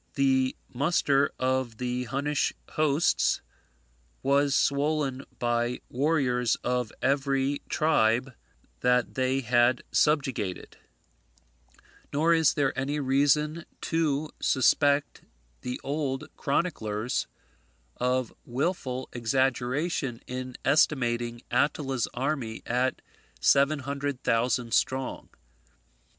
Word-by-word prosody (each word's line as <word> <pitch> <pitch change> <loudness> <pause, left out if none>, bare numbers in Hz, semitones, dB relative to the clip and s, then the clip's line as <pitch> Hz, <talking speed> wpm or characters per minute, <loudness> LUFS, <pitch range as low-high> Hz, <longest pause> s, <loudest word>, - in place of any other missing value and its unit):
The 130 -1 +2
muster 140 0 +2
of 130 -3 -1
the 125 +1 -2
Hunnish 140 +3 -1 0.2
hosts 155 +1 +2 0.8
was 140 +1 +3
swollen 140 -2 +1
by 120 0 0
warriors 125 -4 +1
of 125 -2 -1
every 140 0 +1
tribe 135 -5 +2 0.5
that 125 -1 +2
they 130 +1 0
had 120 +1 +3
subjugated; 135 - 0 1.3
nor 160 +4 +3
is 160 -3 +3
there 140 -3 +1
any 140 +3 -1
reason 145 +4 +2 0.2
to 155 -2 0
suspect 145 +2 +2 0.4
the 125 0 -4
old 140 -2 -2
chroniclers 125 -8 -1 0.7
of 125 -1 0
wilful 130 -1 -2
exaggeration 130 +2 0
in 130 0 -6
estimating 120 -5 +1
Attila's 135 -5 +1
army 130 -4 -2
at 125 +2 0 0.4
seven 140 - +4
hundred 140 -1 -4
thousand 115 0 +1
strong. 130 0 0
135 Hz, 90 wpm, -27 LUFS, 125-145 Hz, 1.3 s, seven